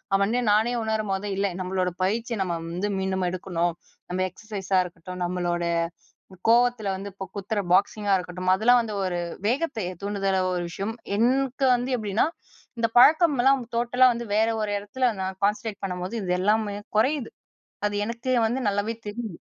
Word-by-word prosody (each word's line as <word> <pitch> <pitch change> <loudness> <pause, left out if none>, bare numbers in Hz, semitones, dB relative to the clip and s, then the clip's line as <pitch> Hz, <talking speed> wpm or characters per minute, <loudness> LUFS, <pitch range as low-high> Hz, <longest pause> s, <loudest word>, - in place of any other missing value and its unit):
அவனே 205 +5 +2
நானே 220 +4 +3
உணரும் 220 -2 -1
போது 195 +2 -3
இல்ல 200 +1 +1
நம்மளோட 185 0 -1
பயிற்சிய 225 +4 -1
நம்ம 175 -2 -2 0.2
வந்து 185 +4 -2
மீண்டும் 190 -1 -1
எடுக்கணும். 175 -1 -1 0.4
நம்ப 185 - -1
எக்ஸர்சைஸா 195 -1 -2
இருக்கட்டும் 180 +1 -9
நம்மளோட 175 -1 -1 0.8
கோவத்தில 240 -3 +3
வந்து 195 +2 -6
இப்போ 195 0 -6
குத்துற 205 +2 -2
பாக்ஸிங்கா 200 +2 +3
இருக்கட்டும் 180 0 -2
அதெல்லாம் 245 +5 +5
வந்து 220 -2 -5
ஒரு 180 -1 -1 0.3
வேகத்தை 245 - 0 0.2
தூண்டுதல 195 -1 0 0.2
ஒரு 175 - -1
விஷயம். 200 +6 -4 0.2
எனக்கு 260 +3 +2
வந்து 245 +2 -2
எப்டின்னா 210 +3 +1 0.5
இந்த 230 - +3
பழக்கம்லாம் 275 -2 +6
டோட்டலா 245 +2 +3
வந்து 235 0 -5
வேற 220 +1 +3
ஒரு 210 - -1
இடத்துல 250 +6 -1
நான் 190 0 -3
கான்சன்ட்ரேட் 210 +1 0
பண்ணும்போது 180 +2 -3
இது 180 -2 -1
எல்லாமே 210 +1 +1 0.2
குறையிது 260 +2 +1 0.6
அது 205 - -4
எனக்கு 235 +3 -3 0.2
வந்து 240 +4 -1
நல்லாவே 205 +3 -1
தெரியிது. 210 -3 -5
205 Hz, 150 wpm, -25 LUFS, 190-235 Hz, 0.8 s, பழக்கம்லாம்